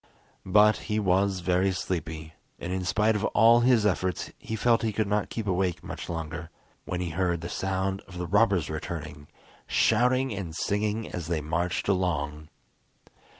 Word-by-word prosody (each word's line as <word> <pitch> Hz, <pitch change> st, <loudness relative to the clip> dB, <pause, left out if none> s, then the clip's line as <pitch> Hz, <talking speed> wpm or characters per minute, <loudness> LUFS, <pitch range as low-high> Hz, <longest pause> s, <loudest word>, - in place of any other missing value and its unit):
But 105 Hz, +3 st, +5 dB
he 105 Hz, -, +1 dB
was 95 Hz, -1 st, +1 dB
very 90 Hz, +2 st, +2 dB
sleepy, 80 Hz, -3 st, -4 dB, 0.2 s
and 90 Hz, +2 st, -4 dB
in 95 Hz, 0 st, -2 dB
spite 105 Hz, +3 st, +2 dB
of 105 Hz, -, -1 dB
all 115 Hz, +1 st, +7 dB
his 120 Hz, -3 st, +4 dB
efforts 95 Hz, -2 st, 0 dB
he 110 Hz, -, -5 dB
felt 115 Hz, +1 st, +3 dB
he 110 Hz, -, 0 dB
could 110 Hz, +1 st, 0 dB
not 105 Hz, 0 st, 0 dB
keep 115 Hz, -, -4 dB
awake 90 Hz, -2 st, 0 dB
much -, -, -7 dB
longer, 80 Hz, 0 st, -5 dB, 0.4 s
when 90 Hz, -, -3 dB
he 90 Hz, -2 st, -3 dB
heard 85 Hz, 0 st, 0 dB
the 85 Hz, -, -5 dB
sound 95 Hz, +1 st, -2 dB
of 95 Hz, -2 st, -10 dB
the 90 Hz, -, -3 dB
robbers 100 Hz, -2 st, +3 dB
returning, 75 Hz, -1 st, -6 dB, 0.4 s
shouting 125 Hz, +2 st, +2 dB
and 90 Hz, -5 st, -5 dB
singing 105 Hz, +4 st, -1 dB
as 85 Hz, -3 st, -5 dB
they 85 Hz, -2 st, 0 dB
marched 80 Hz, +4 st, -2 dB
along. 75 Hz, -6 st, -1 dB
95 Hz, 165 wpm, -27 LUFS, 85-105 Hz, 0.4 s, all